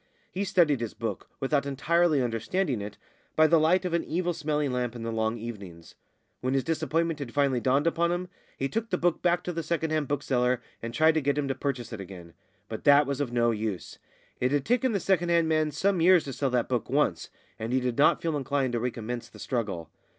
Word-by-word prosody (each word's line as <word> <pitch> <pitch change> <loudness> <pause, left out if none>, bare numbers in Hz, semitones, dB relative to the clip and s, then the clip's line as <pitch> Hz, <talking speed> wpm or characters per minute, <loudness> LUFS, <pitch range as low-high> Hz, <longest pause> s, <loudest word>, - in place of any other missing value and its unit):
He 195 +2 -2
studied 160 -9 +3
his 115 - -4
book, 115 +1 -5
without 140 +1 0
entirely 155 +1 +2
understanding 120 - -1
it, 105 0 -7 0.4
by 155 - +6
the 160 +1 +5
light 175 +4 +3
of 180 - -2
an 170 - +1
evil 175 +2 -1
smelling 150 -3 -1
lamp 125 -1 -2
in 115 - -6
the 115 - -3
long 110 +1 -1
evenings. 100 -8 -9 0.5
When 130 +2 -1
his 135 - +1
disappointment 165 0 -1
had 135 -3 -7
finally 140 -3 +2
dawned 135 +5 +2
upon 170 +1 +2
him, 175 +1 -2 0.3
he 135 - -1
took 225 +9 -3
the 180 - 0
book 175 -1 +1
back 175 0 +2
to 180 - -3
the 165 - -2
second 160 0 -2
hand 155 -2 0
bookseller 125 -3 +1 0.2
and 115 - -5
tried 155 +6 +4
to 160 - +1
get 140 +1 0
him 145 -2 0
to - - +1
purchase 125 -4 -4
it 105 - -5
again; 90 -3 -10 0.3
but 110 - -6
that 145 0 +6
was 140 0 -2
of 130 -4 -2
no 120 -1 +2
use. 105 -4 -4 0.4
It 125 +1 +1
had 145 -2 +1
taken 245 +2 +2
the 200 - 0
second 175 -2 +1
hand 170 -1 +3
man 155 -1 +2
some 185 +4 0
years 180 0 +6
to 135 - -6
sell 135 +2 -1
that 125 -2 0
book 125 -2 -2
once, 130 - +1 0.3
and 110 +2 -4
he 130 - +3
did 125 -1 -2
not 145 - +4
feel 165 -2 0
inclined 135 -2 -1
to 120 - 0
recommence 120 0 -4
the - - -15
struggle. 105 -9 -3
140 Hz, 230 wpm, -27 LUFS, 120-165 Hz, 0.5 s, by